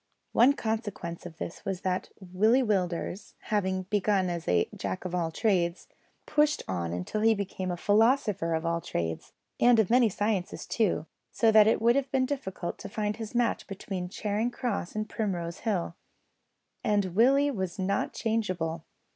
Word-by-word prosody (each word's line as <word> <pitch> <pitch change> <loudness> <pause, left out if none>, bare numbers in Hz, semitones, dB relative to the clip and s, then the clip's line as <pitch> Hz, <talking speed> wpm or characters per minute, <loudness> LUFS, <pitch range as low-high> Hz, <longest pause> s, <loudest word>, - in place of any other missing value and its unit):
One 250 +5 +6
consequence 205 -9 -4
of 165 -2 -13
this 170 - -6
was 195 -3 -3
that 185 0 -1
Willie 210 +7 +2
Willders, 185 -3 -2 0.2
having 190 -2 +1
begun 195 -1 +1
as 170 -1 -5
a 85 -1 +3
Jack 95 - -4
of 180 - -4
all 170 -2 0
trades, 175 -2 0 0.4
pushed 300 0 +2
on 85 -3 -2
until 90 - -3
he 225 0 +5
became 190 -2 -4
a 175 - -2
philosopher 210 -4 +2
of 160 +1 -3
all 170 0 0
trades, 80 - -4 0.3
and 240 -1 +6
of 220 -2 +2
many 245 -2 +5
sciences 205 -2 -2
too, 210 -8 0 0.3
so 225 -1 +3
that 215 -1 +7
it 220 - +3
would 235 +2 +4
have 275 -1 0
been 265 -1 +2
difficult 190 -10 -4
to 200 - -7
find 210 +1 -2
his 225 +1 -7
match 240 -1 +1
between 190 -2 -5
Charing 210 +4 -1
Cross 240 -7 -3
and 215 0 -2
Primrose 175 -6 -3
Hill. 190 -7 -1 0.9
And 200 -4 +1
Willie 275 +6 +4
was 190 -7 -3
not 195 +1 0
changeable. 185 -8 -2
200 Hz, 165 wpm, -28 LUFS, 175-225 Hz, 0.9 s, that